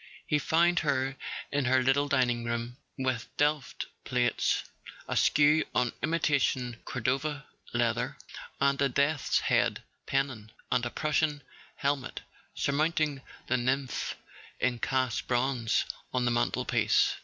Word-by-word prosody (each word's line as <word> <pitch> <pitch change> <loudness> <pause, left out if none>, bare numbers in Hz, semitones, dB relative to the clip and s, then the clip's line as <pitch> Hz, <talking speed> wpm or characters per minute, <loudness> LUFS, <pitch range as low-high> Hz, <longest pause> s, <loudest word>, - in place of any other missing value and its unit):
He 150 - +2
found 170 +3 +3
her 135 -3 0 0.4
in 145 -2 +1
her 130 +1 +3
little 135 +3 +3
dining 125 -4 +2
room, 120 +1 -3 0.2
with 130 -3 -1
Delft 145 -2 0 0.2
plates 125 -1 +1 0.4
askew 150 +2 +4
on 125 - +2
imitation 140 -6 +1
Cordova 135 +5 -1 0.3
leather, 120 -1 0 0.4
and 140 0 +2
a 140 - +3
Death's 140 +3 +1
Head - - +1 0.2
Pennon 130 -6 -1 0.2
and 125 -1 +2
a - - -4
Prussian 150 +1 0 0.3
helmet 140 -1 -2 0.3
surmount¬ 155 +4 +1
ing 150 -3 0 0.2
the 130 - +1
nymph 130 +2 -1 0.4
in 125 -2 +1
cast 130 -2 0
bronze 125 -2 +1 0.3
on 125 -1 0
the 120 - +2
mantelpiece. 120 - +2
135 Hz, 120 wpm, -29 LUFS, 125-145 Hz, 0.4 s, askew